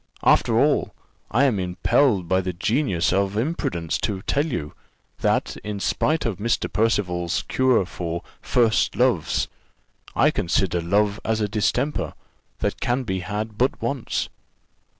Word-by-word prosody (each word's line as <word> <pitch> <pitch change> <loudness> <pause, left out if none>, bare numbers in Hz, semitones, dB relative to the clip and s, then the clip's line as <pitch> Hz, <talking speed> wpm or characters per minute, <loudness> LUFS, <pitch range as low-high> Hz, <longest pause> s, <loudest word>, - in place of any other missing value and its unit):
After - - +4
all, - - +2 0.3
I 120 +6 +3
am 125 -8 +2
impelled 95 +3 +2
by 95 +2 +2
the 90 0 -3
genius 95 - +1
of 100 +1 +1
imprudence 110 - -1
to 100 -3 -2
tell 145 +3 +1
you, 75 - -4 0.5
that, - - 0
in 105 -1 -4
spite 155 +9 0
of 110 -6 -2
Mr. 115 +2 -1
Percival's 90 -6 0
cure 130 -6 +2
for 85 -1 -4 0.2
first 115 -3 +2
loves, - - +1 0.7
I - - +4
consider 90 0 0
love 100 +4 +1
as 110 0 0
a 105 - +1
distemper 115 +8 -1 0.5
that - - -1
can 125 +2 0
be 95 -5 -2
had 105 +3 -4
but 130 +2 +2
once." 140 -4 -2
105 Hz, 140 wpm, -23 LUFS, 90-120 Hz, 0.7 s, After